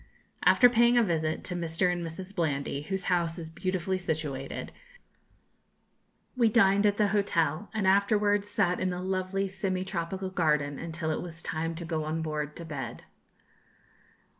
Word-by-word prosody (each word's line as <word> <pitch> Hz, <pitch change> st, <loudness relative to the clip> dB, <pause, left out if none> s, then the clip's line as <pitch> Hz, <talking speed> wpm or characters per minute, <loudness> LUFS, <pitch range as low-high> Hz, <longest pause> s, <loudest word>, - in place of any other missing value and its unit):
After 245 Hz, -, +7 dB
paying 240 Hz, 0 st, +4 dB
a 240 Hz, -, +6 dB
visit 160 Hz, -5 st, -1 dB
to 180 Hz, -, -4 dB
Mr. 175 Hz, +1 st, 0 dB
and 175 Hz, -1 st, -3 dB
Mrs. 185 Hz, +4 st, -7 dB
Blandy, 140 Hz, -4 st, -1 dB
whose 190 Hz, +4 st, -3 dB
house 170 Hz, -2 st, 0 dB
is 160 Hz, -2 st, -7 dB
beautifully 185 Hz, +1 st, -2 dB
situated, 150 Hz, -6 st, -3 dB, 1.6 s
we 235 Hz, -3 st, +4 dB
dined 200 Hz, -2 st, +4 dB
at 205 Hz, 0 st, +1 dB
the 210 Hz, -2 st, +3 dB
hotel, 195 Hz, -3 st, 0 dB
and 215 Hz, -3 st, -1 dB
afterwards 205 Hz, +1 st, +3 dB
sat 180 Hz, -4 st, +1 dB
in 185 Hz, -, 0 dB
the 180 Hz, 0 st, -3 dB
lovely 190 Hz, +1 st, -1 dB
semi 190 Hz, -1 st, -2 dB
tropical 190 Hz, +1 st, -3 dB
garden 150 Hz, -5 st, +1 dB
until 165 Hz, -1 st, -3 dB
it -, -, -2 dB
was 170 Hz, -1 st, -8 dB
time 165 Hz, +1 st, -2 dB
to 170 Hz, +1 st, -6 dB
go 160 Hz, -2 st, -2 dB
on 160 Hz, +1 st, -2 dB
board 150 Hz, -1 st, -3 dB
to 170 Hz, -, -7 dB
bed. 135 Hz, -7 st, -6 dB
180 Hz, 160 wpm, -29 LUFS, 160-195 Hz, 1.6 s, After